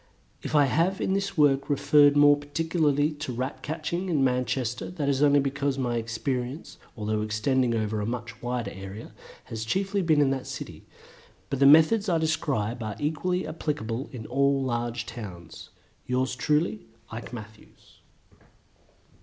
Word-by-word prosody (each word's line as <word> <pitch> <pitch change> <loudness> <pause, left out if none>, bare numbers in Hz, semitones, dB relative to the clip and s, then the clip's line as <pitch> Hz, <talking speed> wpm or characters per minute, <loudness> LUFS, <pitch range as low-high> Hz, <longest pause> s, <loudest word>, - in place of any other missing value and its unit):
If - - -4
I 145 -1 +6
have 170 +8 +1
in 190 - 0
this 195 -1 -2
work 140 -2 +3
referred 145 0 +5
more 145 0 +7
particularly 145 0 0
to 145 -3 -6
Rat 130 +3 -4
catching 165 +4 -3
in 150 -6 +2
Manchester 125 -1 -1
that 165 -6 -3
is 140 -1 +1
only 145 -1 +5
because 140 0 -1
my 120 -3 -1
experience, 125 +4 -4 0.2
although 105 0 -1
extending 115 +3 +1
over 110 -1 -1
a - - -2
much 115 -2 -5
wider 120 -1 -3
area, 95 +3 -9 0.3
has 110 -1 -6
been 110 - -9
chiefly 195 +4 0
in 145 -3 +4
that 135 -1 -3
city, - - -8 0.6
but 135 - -1
the 140 - +6
methods 160 +8 +6
I 170 - +3
describe 135 -8 -1
are 110 -2 -4
equally 180 +5 -1
applicable 145 -6 -3
to 115 -4 -9
all 140 +2 +1
large 120 -1 -2
towns. 90 -8 -9 0.4
Yours 130 0 0
truly, 150 - 0 0.2
IKE 115 +1 -7
MATTHEWS. 110 -2 -12
135 Hz, 155 wpm, -27 LUFS, 120-150 Hz, 0.6 s, more